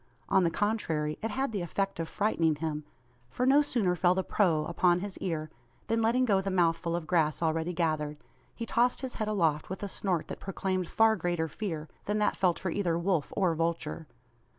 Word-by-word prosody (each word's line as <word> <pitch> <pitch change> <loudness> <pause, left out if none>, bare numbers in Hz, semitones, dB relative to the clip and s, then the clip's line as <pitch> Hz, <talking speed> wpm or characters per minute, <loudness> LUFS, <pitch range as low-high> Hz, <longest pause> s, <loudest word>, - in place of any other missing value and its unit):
On 190 - +4
the 170 - +3
contrary, 165 -7 -1
it 225 - -2
had 265 +3 -1
the 205 -4 -2
effect 195 +2 -2
of 165 -1 -3
frightening 170 -7 +1
him; 150 -1 -3 0.4
for 250 - -1
no 275 +3 +6
sooner 220 -11 +1
fell 180 +1 +3
the 190 - 0
"proh" 165 -8 +2
upon 175 0 +2
his 200 -1 -5
ear, 155 -3 -3 0.3
than 225 0 0
letting 240 +3 +3
go 200 -5 +3
the 195 - -2
mouthful 170 -2 +1
of 170 -2 -3
grass 155 -3 +1
already 165 +1 0
gathered, 155 -3 -1 0.4
he 230 - -4
tossed 240 +2 +2
his 260 -2 -4
head 215 - 0
aloft 165 -8 +1
with 190 +2 -5
a - - -1
snort 185 -4 -1
that - - -6
proclaimed 190 -2 -2
far 225 +3 +4
greater 175 -4 -1
fear 160 -2 -4 0.2
than 210 +1 0
that 210 -1 +2
felt 180 -3 +2
for 185 - -3
either 170 -3 0
wolf 170 -3 0
or 185 -4 +3
vulture! 165 -1 -2
180 Hz, 200 wpm, -30 LUFS, 160-205 Hz, 0.4 s, no